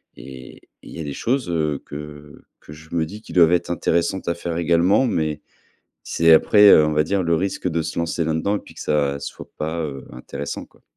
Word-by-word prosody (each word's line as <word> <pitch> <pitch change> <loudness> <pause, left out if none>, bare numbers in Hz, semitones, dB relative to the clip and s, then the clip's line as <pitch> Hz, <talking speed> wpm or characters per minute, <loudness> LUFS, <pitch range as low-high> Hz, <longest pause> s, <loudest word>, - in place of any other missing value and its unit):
et 65 -1 -11
et - - -24
il - - -12
y - - -8
a - - -3
des 70 -1 -5
choses, 125 -5 -1
heu, 75 -4 -1
que 75 0 -10 0.2
que 75 - -13
je 80 +1 -15
me 80 -1 +1
dis 105 +4 -10
qui - - -12
doivent 85 -2 +5
être 85 - 0
intéressantes 85 +3 -1
à 85 - 0
faire 85 -1 -4
également, 85 +8 +3
mais 75 -6 -2 0.6
c'est 80 0 +3
après, 105 +5 +6
heu, 75 - +7
on 75 - -1
va 75 0 +2
dire 95 +3 0
le 85 -1 +1
risque 95 0 -2
de 85 0 -1
se 80 - -5
lancer 85 0 -1
là-dedans 80 +6 0
et - - -5
puis - - -16
que - - -11
ça 70 -2 0
soit - - -8
pas, 80 +2 -3
heu, 70 -4 -6
intéressant, 65 +3 -6
quoi. - - -28
80 Hz, 230 wpm, -21 LUFS, 75-85 Hz, 0.6 s, heu